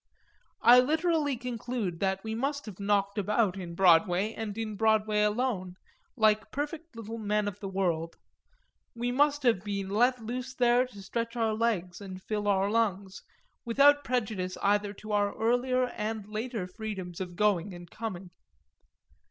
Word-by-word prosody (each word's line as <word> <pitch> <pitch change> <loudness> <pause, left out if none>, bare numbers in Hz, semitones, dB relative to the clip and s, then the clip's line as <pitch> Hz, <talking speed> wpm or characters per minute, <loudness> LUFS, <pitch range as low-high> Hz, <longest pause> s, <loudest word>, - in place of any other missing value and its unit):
I 245 +1 +9
literally 310 0 +1
conclude 235 -6 -4
that 190 0 -1
we 220 0 -4
must 280 +5 -2
have 205 -4 -9
knocked 200 0 +1
about 210 -1 +1
in 175 -3 -7
Broadway, 185 +3 +4
and 215 -2 -5
in 220 -2 -3
Broadway 215 0 +2
alone, 210 -4 0 0.4
like 215 -1 +3
perfect 300 +1 -5
little 230 0 -6
men 210 -1 0
of 205 0 -5
the 200 - -5
world; 170 -4 -1 0.8
we 240 +1 -1
must 290 +2 +2
have 225 -7 +3
been 200 -2 -3
let 245 +4 +3
loose 250 +3 -5
there 245 0 +3
to 205 -5 -12
stretch 230 +3 -3
our 225 -2 +1
legs 215 -5 -1
and 190 -2 -8
fill 210 -1 -2
our 195 -1 +2
lungs, 200 -3 -1 0.4
without 285 +4 +5
prejudice 215 -7 -2
either 205 0 +2
to 215 +1 -9
our 205 -1 +1
earlier 250 +2 +2
and 215 -2 -4
later 220 -1 -4
freedoms 185 -3 -6
of 180 -2 -6
going 205 -2 +1
and 175 -1 -11
coming. 195 -5 -6
215 Hz, 155 wpm, -29 LUFS, 195-240 Hz, 0.8 s, I